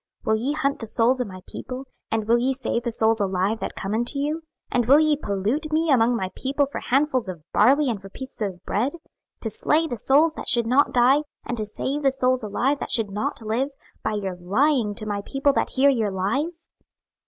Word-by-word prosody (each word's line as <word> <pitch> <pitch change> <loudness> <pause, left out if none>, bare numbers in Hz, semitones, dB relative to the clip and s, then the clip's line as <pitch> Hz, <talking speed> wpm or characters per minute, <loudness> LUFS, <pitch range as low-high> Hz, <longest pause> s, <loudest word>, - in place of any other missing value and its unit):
Will 220 - +2
ye 250 +7 -1
hunt 280 -2 -1
the 225 - -5
souls 245 +4 +2
of 245 - -2
my 185 -1 -10
people, 255 +1 -7 0.2
and 220 -1 -1
will 235 +1 +4
ye 260 +2 +1
save 255 -2 -1
the 235 0 -3
souls 225 0 +2
alive 195 +2 0
that - - -5
come 195 +2 -4
unto 240 +5 -1
you? 295 +3 0
26:013:019 - - -25 0.3
And 245 -1 +2
will 280 +4 +7
ye 310 -1 +3
pollute 235 +5 -2
me 315 0 +2
among 245 -2 +4
my 190 -5 -3
people 280 +2 0
for 280 - -6
handfuls 260 -5 +1
of 170 -4 -7
barley 275 +7 +4
and 220 -6 -2
for 195 - -10
pieces 260 +3 -10
of 185 -4 -4
bread, 240 +8 0 0.5
to - - -1
slay 320 +2 +2
the 245 -7 -4
souls 300 +7 +3
that - - -5
should 235 -1 +4
not 260 +5 +3
die, 255 +4 +4 0.2
and 240 - -3
to 215 -2 -2
save 270 +7 -3
the 275 -2 +3
souls 255 -2 +1
alive 255 +7 0
that - - -5
should 220 -4 +3
not 230 +5 -2
live, 230 +6 -1 0.3
by - - -1
your 195 -3 -3
lying 215 +4 +1
to 215 - -6
my 205 -1 -2
people 275 +3 +1
that - - 0
hear 275 +1 +5
your 225 -5 0
lies? 275 - -2
245 Hz, 225 wpm, -24 LUFS, 215-280 Hz, 0.5 s, will